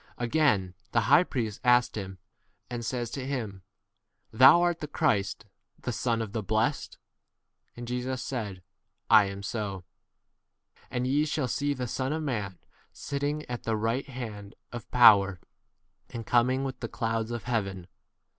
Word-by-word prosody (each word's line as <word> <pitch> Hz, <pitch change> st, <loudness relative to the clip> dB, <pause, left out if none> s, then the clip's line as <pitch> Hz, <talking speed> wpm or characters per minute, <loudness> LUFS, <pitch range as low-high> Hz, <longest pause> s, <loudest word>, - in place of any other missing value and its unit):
Again 120 Hz, -7 st, +1 dB, 0.2 s
the 115 Hz, -, +4 dB
high 145 Hz, +8 st, +5 dB
priest 115 Hz, -, -4 dB
asked 125 Hz, -1 st, +4 dB
him, 95 Hz, -3 st, -6 dB, 0.5 s
and 120 Hz, -1 st, -4 dB
says 120 Hz, 0 st, -3 dB
to 135 Hz, -, -4 dB
him, 115 Hz, -8 st, -4 dB, 0.7 s
Thou 130 Hz, +8 st, +8 dB
art 175 Hz, -1 st, +1 dB
the 150 Hz, -, -5 dB
Christ, 105 Hz, -10 st, 0 dB, 0.3 s
the 125 Hz, -, -4 dB
Son 115 Hz, 0 st, 0 dB
62 -, -, 0 dB
of 105 Hz, -2 st, -8 dB
the 110 Hz, -, -1 dB
blessed? 110 Hz, +2 st, -1 dB, 0.8 s
And 120 Hz, 0 st, -7 dB
Jesus 125 Hz, +1 st, -3 dB
said, 105 Hz, -8 st, -5 dB, 0.5 s
I 110 Hz, -2 st, +8 dB
am 100 Hz, 0 st, -6 dB
[so]. 100 Hz, -4 st, -4 dB, 1.1 s
And 125 Hz, -1 st, -2 dB
ye 145 Hz, +4 st, +2 dB
shall 150 Hz, -3 st, -1 dB
see 145 Hz, +4 st, -1 dB
the 125 Hz, -1 st, -3 dB
Son 130 Hz, +3 st, -2 dB
of 160 Hz, 0 st, -3 dB
man 105 Hz, -, -3 dB, 0.3 s
sitting 145 Hz, +1 st, -3 dB
at 120 Hz, -1 st, -5 dB
the 110 Hz, -1 st, -1 dB
right 115 Hz, +6 st, -1 dB
hand 110 Hz, -6 st, -7 dB, 0.2 s
of 120 Hz, -1 st, -8 dB
power, 100 Hz, -6 st, +6 dB, 0.7 s
and 115 Hz, -1 st, -7 dB
coming 125 Hz, +3 st, +2 dB
with 135 Hz, -1 st, -4 dB
63 -, -, -45 dB
the -, -, -24 dB
clouds 115 Hz, 0 st, -2 dB
of 120 Hz, -1 st, -4 dB
heaven. 100 Hz, -7 st, -2 dB
120 Hz, 160 wpm, -28 LUFS, 105-130 Hz, 1.1 s, Thou